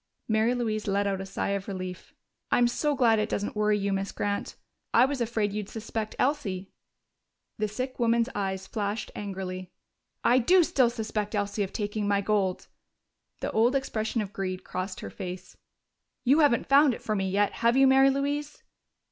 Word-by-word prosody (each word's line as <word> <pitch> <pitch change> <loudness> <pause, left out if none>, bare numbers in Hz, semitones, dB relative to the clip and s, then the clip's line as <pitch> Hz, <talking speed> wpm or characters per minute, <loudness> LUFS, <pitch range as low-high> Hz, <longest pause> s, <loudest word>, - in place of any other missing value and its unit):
Mary 220 +2 +2
Louise 215 -3 -2
let 200 +1 +1
out 195 -1 -1
a 195 - -6
sigh 195 - -2
of 200 -1 -2
relief. 185 -2 -6 0.4
"I'm 245 - +4
so 290 +4 0
glad 230 -4 +4
it 210 +1 -1
doesn't 205 +1 -2
worry 210 0 +2
you, 200 -1 -1
Miss 195 0 -2
Grant. 205 0 -3 0.4
I 240 - +7
was 270 -1 -2
afraid 220 -3 0
you'd 210 -1 -4
suspect 220 -1 -4
Elsie." 205 -10 -1 0.9
The 215 - +1
sick 255 +6 -5
woman's 235 0 +3
eyes 190 -1 -2
flashed 205 +2 -3
angrily. 185 -2 -5 0.5
"I 250 +2 +5
do 355 +9 +5
still 260 -6 +3
suspect 220 -2 -3
Elsie 205 0 -1
of 195 - -1
taking 205 -1 -2
my 200 -1 +2
gold!" 200 -2 0 0.8
The - - -2
old 235 +4 +3
expression 225 -4 -1
of 200 0 -9
greed 185 -1 -3
crossed 185 +1 -5
her - - -7
face. 180 0 -7 0.7
"You 275 +5 +4
haven't 285 -7 +4
found 275 -2 +5
it - - -13
for 215 - -1
me 195 -1 -1
yet, 205 +2 +2
have 235 +2 +4
you, 270 - +6
Mary 270 +1 +6
Louise?" 285 +2 -2
215 Hz, 180 wpm, -27 LUFS, 200-245 Hz, 0.9 s, I